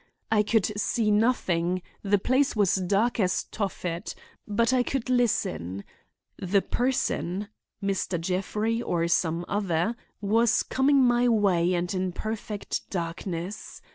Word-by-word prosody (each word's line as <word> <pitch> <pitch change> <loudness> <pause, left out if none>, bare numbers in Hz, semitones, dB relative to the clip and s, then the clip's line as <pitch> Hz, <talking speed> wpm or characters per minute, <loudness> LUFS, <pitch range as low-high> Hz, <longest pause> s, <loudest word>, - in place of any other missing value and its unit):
I 215 -1 +5
could 215 -1 +2
see 210 +1 +1
nothing; 185 -6 +1 0.2
the 205 0 +2
place 260 +7 +1
was 205 -4 +3
dark 200 +6 +1
as 185 -3 +1
Tophet; 180 -3 -3 0.3
but 230 +4 +2
I 255 - +4
could 255 0 -2
listen. 185 - 0 0.6
The 195 +1 +1
person—Mr. 200 -6 -2
Jeffrey, 210 +6 -1
or 170 -7 0
some 170 0 +1
other—was 205 +4 0
coming 270 +1 +3
my 240 0 +3
way 185 -6 +3
and 175 +1 -1
in 185 -1 -1
perfect 215 0 -4
darkness. 170 +2 -5
200 Hz, 115 wpm, -27 LUFS, 180-230 Hz, 0.6 s, I